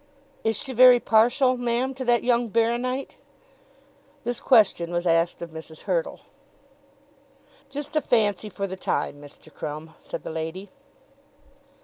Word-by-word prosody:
Is 225 0 +1
she 265 - -5
very 250 0 +8
partial, 245 +4 +3
ma'am, 245 +2 -1
to 265 0 -6
that 240 -1 +2
young 240 -1 +2
baro 230 +2 +2
nite?" 255 +2 -4 1.1
This 240 +1 -2
question 205 -8 +3
was 175 0 -2
asked 165 0 +1
of 170 - -8
Mrs. 160 0 -10
Hurtle. - - -2 1.5
"Just 290 +3 -7
a 305 - +3
fancy 215 -5 +1
for 200 0 -4
the 190 -1 -5
time, 145 -5 -2
Mr. 145 +2 -14
Crumb," 155 +2 -7
said - - -7
the - - -6
lady. 165 +5 -5
225 Hz, 140 wpm, -25 LUFS, 170-250 Hz, 1.5 s, very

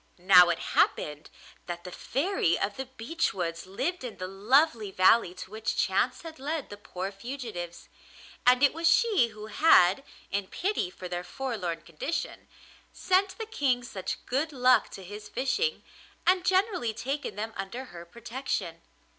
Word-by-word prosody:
Now 180 -1 +7
it 170 - +1 0.2
happened 150 0 +1 0.4
that 175 -1 -5
the 180 - -8
Fairy 275 - 0
of 200 +1 -2
the 265 -1 -5
Beech 265 +5 -2
Woods 170 -1 -3
lived 285 - -3
in 245 -3 -6
the 185 - -4
lovely 220 - +2
valley 185 0 +4
to 185 +1 -9
which 220 +1 -3
chance - - +1
had 320 -4 -9
led 295 -1 -3
the 205 - -7
poor 190 -1 -5
fugitives, 205 -5 -7 0.6
and 250 +2 +5
it 285 - +5
was 330 +1 0
she 410 - +4
who 215 -1 -10
had, 215 - +5 0.3
in 200 -1 -1
pity 380 - -1
for 185 0 -8
their 175 0 -4
forlorn 180 -6 -4
condition, 170 - -4 0.4
sent 380 +1 +1
the 450 - -4
King 275 - 0
such 190 -6 -5
good 285 +5 -1
luck 255 -2 +4
to 195 - -10
his 205 +3 -9
fishing, 340 - -1 0.4
and 365 0 +4
generally 370 - +1
taken 270 -2 -3
them 220 +2 -4
under 205 +7 -5
her 170 -1 -8
protection. 235 +8 -5
230 Hz, 160 wpm, -28 LUFS, 185-285 Hz, 0.6 s, Now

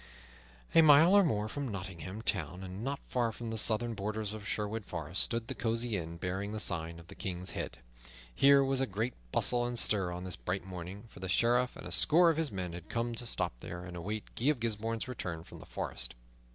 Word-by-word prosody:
A 165 - +8
mile 155 +4 +8
or 200 0 +7
more 105 - 0
from 140 +4 -4
Nottingham 95 -1 -6
Town, 90 -3 -2
and 95 +3 -6
not 140 +2 -1
far 120 -2 0
from 115 0 -6
the 115 - -2
southern 115 +2 +3
borders 105 0 -3
of 110 -1 -7
Sherwood 110 +1 -2
Forest, 85 0 -3
stood 115 -1 0
the 135 - -3
cosy 115 -2 0
inn 85 -2 -4
bearing 95 +4 -3
the 110 - -3
sign 85 -4 -1
of 85 - -12
the - - -11
King's 90 -1 -4
Head. - - -4 0.6
Here 140 - +6
was 135 0 +2
a 135 - +1
great 110 +5 -2 0.2
bustle 120 -1 +3
and 120 0 -2
stir 95 -5 +3
on 90 +1 -5
this 90 -1 -2
bright 90 0 -3
morning, 95 +2 -7
for - - -13
the 95 0 -4
Sheriff 120 +5 +3
and - - -9
a - - -6
score 170 +2 +7
of 160 - -3
his 160 -3 0
men 90 -3 -4
had 85 -1 -9
come 120 0 -1
to 120 +1 -3
stop - - -1
there 85 +6 -7
and 90 -1 -8
await 105 +5 -5
Guy 120 - -3
of 150 -4 +3
Gisbourne's 115 0 -2
return 90 -10 -5
from - - -12
the - - -12
forest. - - -4
110 Hz, 225 wpm, -32 LUFS, 90-120 Hz, 0.6 s, A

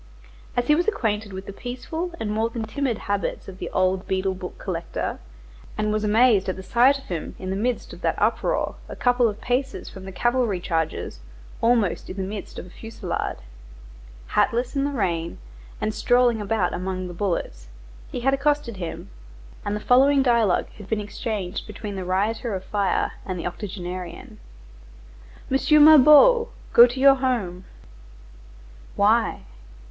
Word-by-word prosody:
As 245 - +2
he 300 - +4
was 345 +5 +1
acquainted 220 - -1
with 190 0 -7
the 200 - -8
peaceful 255 - -5
and 210 - -2
more 220 +2 0
than 230 -1 -4
timid 240 +1 -2
habits 200 -1 -3
of 190 -1 -10
the - - -4
old 185 +1 0
beadle 190 0 0
book 185 -1 -8
collector, 170 -3 -4 0.6
and 210 0 0
was 215 0 -1
amazed 210 -2 +4
at 185 - -1
the 190 - -9
sight 245 +8 +4
of 275 - -13
him 175 -10 -5
in 185 0 -5
the - - -1
midst 235 +4 -2
of - - -12
that - - 0
uproar, - - 0
a - - -6
couple 245 -1 +3
of 210 -1 -4
paces 260 +2 -2
from 190 0 -10
the 190 - -7
cavalry 240 -2 0
charges, 160 - -2 0.4
almost 230 -6 +1
in 190 - -7
the 190 - -2
midst 200 +2 -6
of - - -6
a - - -13
fusillade, 225 +3 -4 0.9
hatless 240 +4 +1
in 275 0 +1
the - - 0
rain, 170 -9 -2 0.4
and 215 - -1
strolling 245 0 +3
about 205 -3 0
among 185 0 -3
the 175 - -7
bullets, 170 - -3 0.4
he - - -4
had 270 +2 +2
accosted 280 -5 0
him, 175 -3 -6 0.5
and 205 - -2
the - - -3
following 270 +4 +4
dialogue 235 -7 +3
had 205 - -11
been 220 - 0
exchanged 205 -2 -4
between 210 -1 -7
the 190 - -4
rioter 205 +5 -1
of 185 - -5
fire 200 -2 0
and 185 -2 -4
the 170 - -5
octogenarian:— 180 -2 -6 1.1
"M. 295 +3 +5
Mabeuf, 310 - +8 0.3
go 240 +1 +9
to 245 +2 -6
your 275 0 +7
home." 205 -9 -2 1.3
"Why?" - - +2
215 Hz, 165 wpm, -24 LUFS, 190-250 Hz, 1.3 s, go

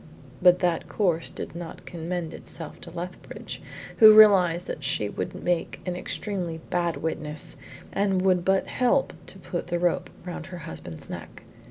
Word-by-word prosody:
But 180 0 +7
that 175 -3 0
course 175 -6 +1
did - - -6
not 170 -1 -8
commend 170 -1 -4
itself - - -8
to - - -9
Lethbridge, - - -7 0.4
who 215 -1 +10
realised 185 -5 +7
that 150 - -5
she 125 -6 0
would 90 - -5
make 175 -1 0
an 180 -1 -2
extremely 180 -2 -3
bad 175 -1 0
witness 155 -1 -4 0.4
and 195 -2 +1
would 185 -2 +3
but 190 +1 +2
help 255 +2 +1
to - - -10
put 175 -2 -5
the 175 0 0
rope 175 0 0 0.2
round 180 - -6
her 180 - -7
husband's 85 - -8
neck. - - -9
175 Hz, 160 wpm, -26 LUFS, 165-190 Hz, 0.4 s, who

